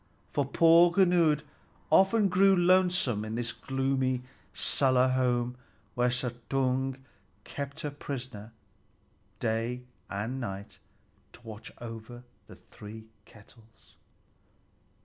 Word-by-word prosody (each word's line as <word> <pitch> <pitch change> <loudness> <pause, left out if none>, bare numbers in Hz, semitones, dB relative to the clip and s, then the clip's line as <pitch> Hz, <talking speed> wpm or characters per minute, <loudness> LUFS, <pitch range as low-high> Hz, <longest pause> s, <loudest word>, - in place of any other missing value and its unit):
For 145 - 0
poor 165 +4 +6
Gunnlöd 170 -5 +3 0.5
often 200 +2 +5
grew 195 +1 +5
lonesome 180 - +3
in 110 +1 -4
this 120 -1 -2
gloomy 130 -1 -1 0.3
cellar 130 -2 +2
home, 125 -1 0 0.4
where 125 0 +2
Suttung 130 +2 -1 0.5
kept 140 +4 -6
her 150 - -3
prisoner 130 -6 -7 0.9
day 115 +3 -1 0.3
and 110 +6 -3
night 100 -3 -6 0.5
to - - -14
watch 110 -1 -9
over 120 +1 -9 0.2
the - - -12
three 110 +1 -12 0.2
kettles. 110 0 -20
130 Hz, 100 wpm, -29 LUFS, 115-145 Hz, 0.9 s, poor